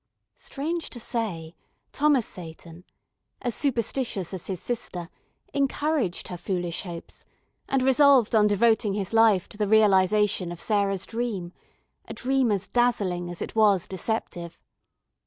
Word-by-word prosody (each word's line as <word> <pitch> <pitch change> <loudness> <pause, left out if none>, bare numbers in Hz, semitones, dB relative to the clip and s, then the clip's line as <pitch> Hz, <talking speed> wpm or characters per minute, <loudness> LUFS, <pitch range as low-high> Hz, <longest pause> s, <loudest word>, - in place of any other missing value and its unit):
Strange 325 +4 -4
to 240 - -9
say, 185 -9 -3 0.4
Thomas 280 -5 +2
Seyton, 165 0 -10 0.5
as 240 -2 -2
superstitious 230 - -1
as 185 - -6
his 185 -3 -4
sister, 180 -8 -4 0.4
encouraged 280 - -1
her 180 - -5
foolish 175 -2 -3
hopes, 170 -3 -8 0.5
and 270 -1 +1
resolved 265 -3 +5
on 215 -1 +5
devoting 215 0 +2
his 200 0 -3
life 220 -5 +4
to - - -12
the 210 -1 0
realisation 205 -3 +3
of 175 - -8
Sarah's 200 -3 0
dream, 220 -7 -4 0.5
a - - -8
dream 260 -2 +1
as 200 -2 0
dazzling 200 -8 0
as 175 - -5
it - - -7
was 205 -5 +3
deceptive. 180 -3 -4
210 Hz, 135 wpm, -26 LUFS, 180-240 Hz, 0.5 s, resolved